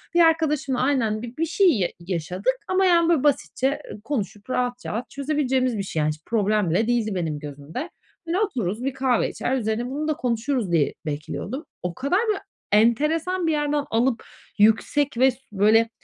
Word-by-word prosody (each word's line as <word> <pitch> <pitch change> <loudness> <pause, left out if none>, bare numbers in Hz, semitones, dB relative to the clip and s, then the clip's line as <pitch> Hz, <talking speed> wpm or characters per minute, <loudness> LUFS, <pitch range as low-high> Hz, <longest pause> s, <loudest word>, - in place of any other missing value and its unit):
Bir - - +5
arkadaşımla 300 -5 +2
aynen 245 -6 +1
bi 240 +1 -8
bir 330 - +1
şey 370 +3 +4
ya 180 - +1
yaşadık. 180 +7 -2
Ama, 375 +1 +2
yani, 340 -2 +4
böyle 310 -5 +3
basitçe 280 -1 +1 0.2
konuşup 210 -5 -4
rahat, 250 0 -1
rahat 230 +3 -4
çözebileceğimiz 265 -4 0
bir 200 - -2
şey, 175 -4 -3
yani. 150 - +2
Hiç 150 0 -5
problem 210 -4 +1
bile 190 +8 +1
değildi 230 -4 0
benim 160 -4 -2
gözümde. 150 - -6 0.4
Böyle 345 +3 0
otururuz, 240 - -1
bir 270 - -1
kahve 260 -3 +1
içer, 265 - -1
üzerine 230 +1 -1
bunu 295 +3 -3
da 310 - +2
konuşuruz 240 -4 -1
diye 160 -4 +2
bekliyordum. 155 - -4 0.2
O 180 -1 -2
kadar, 285 +9 +1
böyle, 425 -2 +1 0.3
enteresan 315 - +2
bir - - +3
yerden 295 -1 0
alıp 235 +2 +1 0.4
yüksek 230 +5 +3
ve 260 +1 +5
s - - -16
böyle 215 +3 +4
250 Hz, 175 wpm, -24 LUFS, 210-295 Hz, 0.4 s, Bir